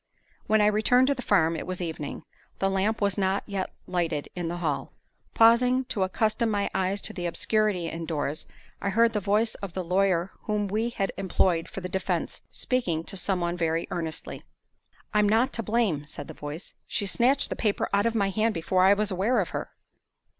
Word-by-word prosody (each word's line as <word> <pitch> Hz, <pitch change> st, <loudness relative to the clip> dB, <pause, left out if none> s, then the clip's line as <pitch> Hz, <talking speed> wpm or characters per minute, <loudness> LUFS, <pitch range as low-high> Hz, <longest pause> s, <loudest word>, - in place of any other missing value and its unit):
When 215 Hz, 0 st, +4 dB
I -, -, +5 dB
returned 220 Hz, +5 st, +4 dB
to -, -, +4 dB
the 255 Hz, -, -6 dB
farm, 165 Hz, -8 st, +3 dB
it -, -, -5 dB
was 185 Hz, 0 st, -3 dB
evening. 160 Hz, -5 st, -5 dB, 0.3 s
The 195 Hz, 0 st, +1 dB
lamp 205 Hz, +4 st, 0 dB
was 200 Hz, 0 st, +1 dB
not 190 Hz, +1 st, +1 dB
yet 195 Hz, -2 st, -3 dB
lighted 165 Hz, -5 st, -1 dB
in 175 Hz, -2 st, -3 dB
the 175 Hz, +1 st, -3 dB
hall. 160 Hz, -5 st, -2 dB, 0.4 s
Pausing 250 Hz, +3 st, +5 dB
to 205 Hz, -, -2 dB
accustom 215 Hz, +4 st, +1 dB
my 205 Hz, -2 st, 0 dB
eyes 190 Hz, +2 st, -1 dB
to -, -, +2 dB
the 175 Hz, -2 st, -3 dB
obscurity 205 Hz, 0 st, 0 dB
indoors, 160 Hz, -3 st, -3 dB, 0.3 s
I 200 Hz, -, 0 dB
heard 230 Hz, +3 st, +3 dB
the 210 Hz, -, +1 dB
voice 210 Hz, +3 st, +1 dB
of 195 Hz, -4 st, -5 dB
the 185 Hz, -, -3 dB
lawyer 185 Hz, 0 st, +1 dB
whom 210 Hz, -1 st, 0 dB
we 220 Hz, +4 st, 0 dB
had 200 Hz, -5 st, -2 dB
employed 180 Hz, -3 st, +1 dB
for 195 Hz, -, -6 dB
the 180 Hz, -, -4 dB
defense 190 Hz, +1 st, -2 dB
speaking 180 Hz, -11 st, -1 dB
to 195 Hz, -, -7 dB
some 185 Hz, 0 st, 0 dB
one 175 Hz, 0 st, -1 dB
very 165 Hz, -1 st, 0 dB
earnestly. 165 Hz, -2 st, -4 dB, 0.7 s
"I'm 210 Hz, -1 st, +4 dB
not 235 Hz, +5 st, +3 dB
to 230 Hz, -, -2 dB
blame," 210 Hz, -10 st, 0 dB
said -, -, -6 dB
the -, -, -8 dB
voice. 150 Hz, +4 st, -7 dB
"She 205 Hz, -, -1 dB
snatched 255 Hz, +7 st, +2 dB
the -, -, -1 dB
paper 210 Hz, -3 st, 0 dB
out 200 Hz, +3 st, +3 dB
of 230 Hz, -, -1 dB
my 200 Hz, -3 st, +1 dB
hand 220 Hz, +3 st, +1 dB
before 185 Hz, +3 st, +1 dB
I 195 Hz, +2 st, +6 dB
was 210 Hz, 0 st, 0 dB
aware 205 Hz, +6 st, +2 dB
of 180 Hz, -, -1 dB
her." -, -, -4 dB
195 Hz, 200 wpm, -27 LUFS, 175-215 Hz, 0.7 s, I